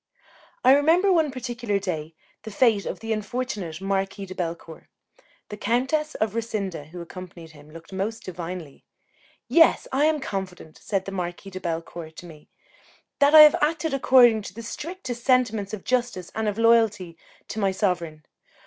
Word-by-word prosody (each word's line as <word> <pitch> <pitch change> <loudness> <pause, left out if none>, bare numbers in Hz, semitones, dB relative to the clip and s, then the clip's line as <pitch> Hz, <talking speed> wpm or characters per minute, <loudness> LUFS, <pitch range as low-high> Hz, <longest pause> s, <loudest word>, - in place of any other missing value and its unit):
I 255 +1 +7
remember, 335 +7 +4
one 320 -4 +2
particular 240 -5 -3
day, 165 -5 -4 0.3
the 220 - -8
fate 220 -1 +2
of - - -5
the 225 0 -2
unfortunate 210 -6 -4
Marquis 195 0 -2
de 185 - -8
Bellecourt. 165 -2 -6 0.6
The 210 - -7
Countess 265 +9 0
of 215 -2 -1
Rassinda, 205 -8 -3
who 175 +3 -9
accompanied 170 -1 -10
him, 150 0 -16
looked 165 +4 -13
most 210 +4 -3
divinely. 175 -4 -7 0.6
"Yes, 330 -1 +4
I 275 +3 +2
am 310 -1 +2
confident," 190 - -6
said 195 -2 -2
the 195 - -5
Marquis 180 +1 -5
de 185 - -6
Bellecourt 165 -1 -5
to 175 - -10
me, 155 -3 -14 0.7
"that 285 +2 +5
I 310 - +12
have 300 -1 +9
acted 315 0 0
according 250 -4 +5
to 200 -2 -10
the 230 - -8
strictest 255 - -6
sentiments 235 -6 +2
of 215 -3 -6
justice 245 -8 -1
and 220 -1 -2
of 210 0 -2
loyalty 225 -6 +3 0.3
to 220 - -4
my 200 -2 +2
sovereign. 175 -5 -2
205 Hz, 165 wpm, -24 LUFS, 180-250 Hz, 0.7 s, I